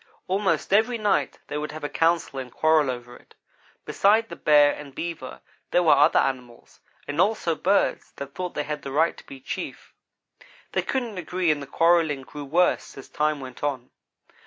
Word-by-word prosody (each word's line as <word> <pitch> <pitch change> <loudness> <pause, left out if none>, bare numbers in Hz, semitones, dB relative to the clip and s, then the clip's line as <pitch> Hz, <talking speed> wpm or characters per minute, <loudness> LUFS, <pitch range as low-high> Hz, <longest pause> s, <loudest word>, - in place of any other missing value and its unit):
Almost 190 0 0
every 225 +4 +3
night 210 -3 0
they 145 0 -4
would 150 0 -4
have 155 - -8
a - - 0
council 165 -3 0
and 125 -2 -7
quarrel 155 -1 +3
over 120 -1 -6
it. - - -20 0.5
Beside 220 +3 +3
the - - -7
Bear 145 -1 +5
and 140 -2 -10
Beaver, 165 -6 -6 0.3
there 180 - +3
were 155 - +6
other 145 +3 +5
animals, 125 -3 -2 0.3
and 145 +3 0
also 200 -4 +1
birds, 195 +5 +1
that 140 0 -8
thought 180 -1 -5
they 150 - -1
had 150 0 -5
the 135 - -7
right 160 +4 +2
to - - -15
be 135 - -10
chief. 130 - -7 0.8
They - - 0
couldn't 235 -7 -3
agree 180 0 0
and 145 -1 -1
the 140 - -8
quarrelling 165 -2 +2
grew 145 +2 -9
worse 170 +2 +1
as 135 - -11
time 150 -1 0
went 130 -1 -10
on. 135 -4 -3
150 Hz, 185 wpm, -25 LUFS, 140-180 Hz, 0.8 s, were